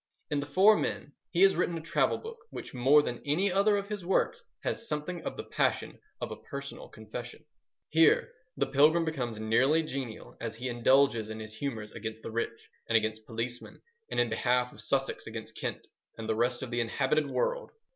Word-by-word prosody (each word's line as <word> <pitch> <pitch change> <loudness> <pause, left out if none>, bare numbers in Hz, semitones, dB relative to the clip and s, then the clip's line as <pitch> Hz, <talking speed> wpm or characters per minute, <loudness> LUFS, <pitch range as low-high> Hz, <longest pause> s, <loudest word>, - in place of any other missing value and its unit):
In 145 - +1
The 140 - -4
Four 195 +8 +6
Men 145 - -3 0.2
he 180 +1 +3
has 195 - +6
written 175 -1 0
a - - -3
travel 160 - +1
book 455 +1 -9
which - - -8
more 135 +4 +5
than 120 -4 -4
any 180 +7 +1
other 200 +2 +4
of 200 0 -3
his 205 -3 -4
works 185 +2 +1 0.2
has 230 - -2
something 155 +3 -3
of - - -4
the - - -4
passion - - 0 0.2
of - - -4
a - - -4
personal 140 -1 -6
confession. 120 +6 -8 0.4
Here 160 +1 +4 0.2
the 140 - +2
pilgrim 150 +5 +4
becomes 125 -8 -3
nearly 130 +9 +3
genial 135 -7 -6
as 115 -1 -4
he 125 +3 -4
indulges 120 -2 +3
in 110 0 -5
his 110 0 -7
humours 110 -3 -4
against 110 0 -6
the - - -5
rich 115 0 -3 0.2
and 115 - +6
against 110 0 -2
policemen 120 +2 -5 0.3
and - - -1
in 120 -2 +2
behalf 125 +2 +1
of - - -9
Sussex 135 -1 -1
against 110 0 -7
Kent - - -4 0.3
and 110 -1 -5
the 110 - +2
rest 120 +3 +1
of 130 - -6
the 120 0 +1
inhabited 140 +5 +1
world. - - -1
130 Hz, 195 wpm, -30 LUFS, 115-160 Hz, 0.4 s, Four